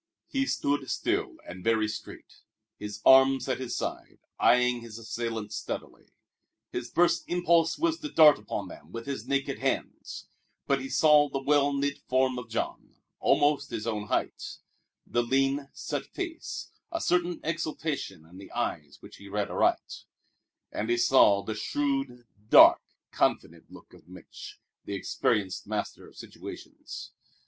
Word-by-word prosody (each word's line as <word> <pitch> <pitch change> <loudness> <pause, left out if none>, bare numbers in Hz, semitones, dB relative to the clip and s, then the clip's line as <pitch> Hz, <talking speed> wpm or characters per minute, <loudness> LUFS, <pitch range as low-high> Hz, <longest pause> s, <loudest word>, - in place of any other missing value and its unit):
He 270 0 -1
stood 140 - -1
still - - -1
and 90 +1 -9
very 110 -1 +2
straight, 110 - -9 0.4
his 105 0 -7
arms 135 0 +6
at 130 - -1
his 130 -2 -4
sides, - - -5 0.2
eying 125 0 +4
his 115 -1 -9
assailants 115 -1 -4
steadily. - - -6 0.6
His 120 -1 -4
first 175 0 +2
impulse 170 -2 +2
was 330 0 0
to 300 - -5
dart 155 - +7
upon 105 -1 -5
them 80 -2 -13
with 115 +2 -7
his 140 -1 -5
naked 140 0 -1
hands; - - -3 0.4
but 135 -1 +1
he 135 - -6
saw 150 -1 +5
the 135 - -2
well 145 0 +3
knit 140 0 -1
form 130 -1 +2
of 115 -2 -10
Jean, 115 - -4 0.2
almost 145 -1 +2
his 105 - -4
own 105 -2 -3
height, - - -2 0.5
the 120 - 0
lean, 135 +3 0
set - - -5
face, 345 -3 -6 0.2
a 335 - -2
certain 175 - 0
exultation 155 - -3
in 90 +3 -14
the 100 - -12
eyes 75 -2 -3
which - - -12
he 100 - -12
read 105 0 -2
aright; - - 0 0.7
and 110 +2 -3
he 120 - +2
saw 120 -5 +5
the 110 - -3
shrewd, 135 +1 -2 0.2
dark, - - +8 0.3
confident - - -1
look - - -15
of - - -18
Mich', 90 0 -12 0.2
the 100 - -5
experienced 95 0 -1
master - - -4
of - - -18
situations. - - -9
130 Hz, 150 wpm, -28 LUFS, 110-145 Hz, 0.7 s, dark